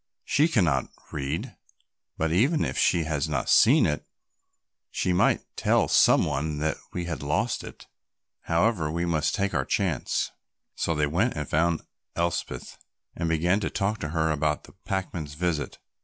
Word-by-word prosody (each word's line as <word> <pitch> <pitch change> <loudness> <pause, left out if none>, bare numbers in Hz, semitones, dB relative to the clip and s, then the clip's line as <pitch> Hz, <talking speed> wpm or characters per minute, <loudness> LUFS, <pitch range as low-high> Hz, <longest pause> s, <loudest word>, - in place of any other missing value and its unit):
She 150 +3 +3
cannot 85 - +1 0.2
read, 70 +2 -4 0.6
but 80 0 0
even 135 - +3
if - - -3
she 85 -2 +3
has 75 -3 -1
not - - -1
seen - - +6
it, 75 - -1 0.9
she 90 - 0
might 90 - +3
tell - - +2
some - - +5
one 75 +1 -2
that 75 0 -1
we 90 -1 -3
had 85 -2 -4
lost 100 +12 -1
it. - - -11 0.6
However, 85 -1 +1
we 85 +2 -1
must 80 -3 0
take 100 -1 -1
our - - +1
chance." 90 - -1 0.4
So 80 - -1
they 75 0 +2
went 90 - 0
and 75 -2 -3
found 85 +2 +1 0.3
Elspeth 85 0 -3 0.4
and 85 -1 -2
began 85 +5 +2
to 105 - -2
talk 105 +2 -1
to 75 - -4
her 80 0 +1
about 75 0 0
the - - -16
packman's 85 -7 -3
visit. 85 -2 -2
85 Hz, 160 wpm, -26 LUFS, 75-95 Hz, 0.9 s, seen